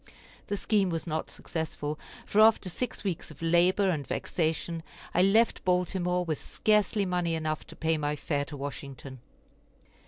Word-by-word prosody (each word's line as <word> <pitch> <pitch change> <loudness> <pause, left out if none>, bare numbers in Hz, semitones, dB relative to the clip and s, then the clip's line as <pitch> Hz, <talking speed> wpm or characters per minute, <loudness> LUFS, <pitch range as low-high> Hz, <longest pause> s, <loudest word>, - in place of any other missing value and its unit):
The 205 - -1
scheme 200 -2 +2
was 165 -2 -2
not 160 -2 -2
successful, 155 -2 -4 0.3
for 210 - +3
after 215 -3 +5
six 250 +4 -3
weeks 190 -5 -3
of 155 - -13
labor 175 +4 +3
and 145 -5 -3
vexation, 165 0 -1 0.3
I 180 - +4
left 215 +5 +4
Baltimore 180 -1 +1
with 155 -3 -2
scarcely 210 -1 +2
money 175 -2 0
enough 155 -1 -2
to - - -11
pay 160 -1 +1
my 145 0 0
fare 145 -1 -1
to 145 0 -8
Washington. 135 -1 -7
170 Hz, 155 wpm, -29 LUFS, 155-190 Hz, 0.3 s, after